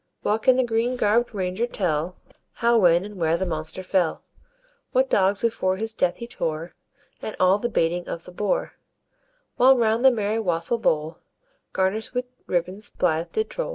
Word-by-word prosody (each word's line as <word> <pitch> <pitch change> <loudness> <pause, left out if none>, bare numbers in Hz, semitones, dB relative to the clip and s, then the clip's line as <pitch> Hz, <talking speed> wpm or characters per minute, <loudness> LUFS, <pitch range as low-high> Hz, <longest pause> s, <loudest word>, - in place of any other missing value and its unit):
Well 215 +1 +1
can 255 +3 +4
the 260 - +3
green 235 +1 0
garb'd 235 +1 +2
ranger 190 +3 -2
tell 180 -5 -2 0.4
How, 235 0 +2
when, 175 -1 +4
and 205 -1 -10
where 165 -1 +1
the 190 - -2
monster 160 +1 -2
fell; 180 -3 0 0.7
What 260 0 +2
dogs 195 +2 +2
before 190 -5 +1
his 220 +2 -2
death 175 -5 +1
he 235 - -6
tore, 165 -7 -4 0.5
And 215 - -5
all 185 +2 +4
the 240 - -2
baiting 175 -3 0
of 165 - -6
the - - -11
boar; 200 +2 -1 0.8
While 260 +1 +6
round 225 0 +2
the 265 - +9
merry 220 -2 -1
wassel 180 +3 0
bowl, 155 -6 0 0.5
Garnish'd 190 +5 -1
with 250 0 0 0.2
ribbons, 185 +4 -2
blithe 160 +1 -1
did 440 0 -2
trowl. - - -3
200 Hz, 175 wpm, -24 LUFS, 175-230 Hz, 0.8 s, the